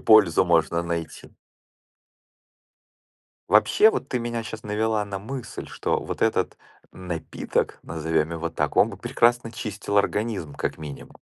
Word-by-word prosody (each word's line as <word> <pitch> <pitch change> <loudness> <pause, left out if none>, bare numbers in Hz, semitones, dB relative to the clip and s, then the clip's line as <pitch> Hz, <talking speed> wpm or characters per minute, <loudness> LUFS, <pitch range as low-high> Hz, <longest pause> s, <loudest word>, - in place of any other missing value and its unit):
пользу 100 -5 +6
можно 85 -1 +2
найти. 85 -1 -4 2.2
Вообще, 215 - +6
вот, 135 - -3
ты 125 - -1
меня 120 -1 -3
щас 110 -1 -7
навела 110 +1 0
на 100 -1 -4
мысль, 120 +3 -6
что - - -1
вот - - -6
этот - - +1 0.3
напиток, 90 -3 -3
назовём 80 0 -1
его 85 0 -3
так, 75 -1 -2
он - - +5
бы - - -9
прекрасно 120 0 +2
чистил 105 -3 -4
организм, 100 -6 0
как - - -2
минимум. 75 -3 -9
100 Hz, 135 wpm, -25 LUFS, 85-110 Hz, 2.2 s, пользу